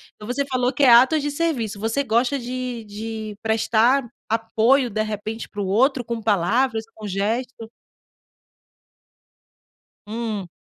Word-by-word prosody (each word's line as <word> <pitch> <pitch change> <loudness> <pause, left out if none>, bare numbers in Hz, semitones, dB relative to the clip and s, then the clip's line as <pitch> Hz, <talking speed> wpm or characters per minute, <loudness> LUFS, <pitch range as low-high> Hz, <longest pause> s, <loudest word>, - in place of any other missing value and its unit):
Então 210 - -11
você 280 +3 -1
falou 255 -1 0
que 285 - 0
é 255 - +7
atos 260 +6 +6
de 290 0 -2
serviço. 255 -10 -2
Você 225 +6 0
gosta 245 +3 +1
de 250 -1 -5
de 215 0 -6
prestar 225 +4 +2 0.2
apoio, 230 +3 +2
de 215 +1 -1
repente, 215 +1 -5
para 205 - -6
o 190 - -2
outro 250 +6 +2
com 230 -1 -4
palavras, 225 +4 +1
com 215 -1 -8
gestos? 225 +4 -3 2.4
Hum. 215 -4 -4
230 Hz, 135 wpm, -22 LUFS, 215-255 Hz, 2.4 s, é